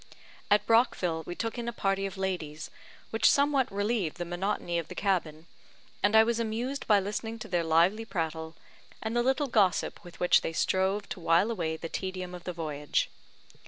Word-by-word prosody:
At 205 0 +4
Brockville 195 -8 +2
we 175 - -4
took 230 +4 -3
in 235 - -4
a - - 0
party 195 -3 0
of 195 - -9
ladies, 165 -5 -3 0.4
which 225 - +4
somewhat 280 -2 +3
relieved 205 -4 -1
the 175 - -3
monotony 175 -1 -2
of 165 - -6
the - - -9
cabin, 170 -5 -1 0.6
and 205 +2 +3
I 220 - +9
was 235 0 0
amused 235 +5 -3
by 210 -2 +6
listening 215 +3 -4
to 220 - -8
their 175 -2 0
lively 170 +7 +3
prattle, 160 -4 -3 0.5
and 220 +1 -2
the 240 - +3
little 265 +4 +2
gossip 205 -9 +1
with 175 -1 -13
which 180 - +5
they 165 - -3
strove 190 +4 +1
to - - -5
wile 170 +6 +3
away 165 -7 -2
the 165 - -5
tedium 185 +1 -4
of 180 -1 -9
the 180 - -2
voyage. 150 -3 -2
190 Hz, 190 wpm, -29 LUFS, 170-225 Hz, 0.6 s, I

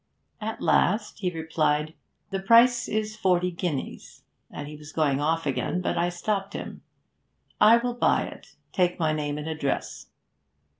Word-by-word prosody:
At 220 +1 -4
last 210 +4 +2
he 185 -3 0
replied, 160 -2 0 0.4
"The 195 - -1
price 235 +4 +5
is 215 0 -2
forty 180 -4 +1
guineas," 170 -5 -5 0.3
and 145 - -7
he 150 - -8
was 150 0 -11
going 145 -4 +1
off 165 +2 0
again, 145 +5 -1
but 180 - -1
I 170 +1 +1
stopped 195 +3 -2
him. - - -7 0.8
"I 215 +2 +7
will 245 +1 -2
buy 240 - +2
it. - - -11 0.2
Take 180 -1 +1
my 160 -2 +1
name 150 -1 -2
and 150 +1 -5
address." 155 -3 -3
175 Hz, 155 wpm, -26 LUFS, 155-210 Hz, 0.8 s, I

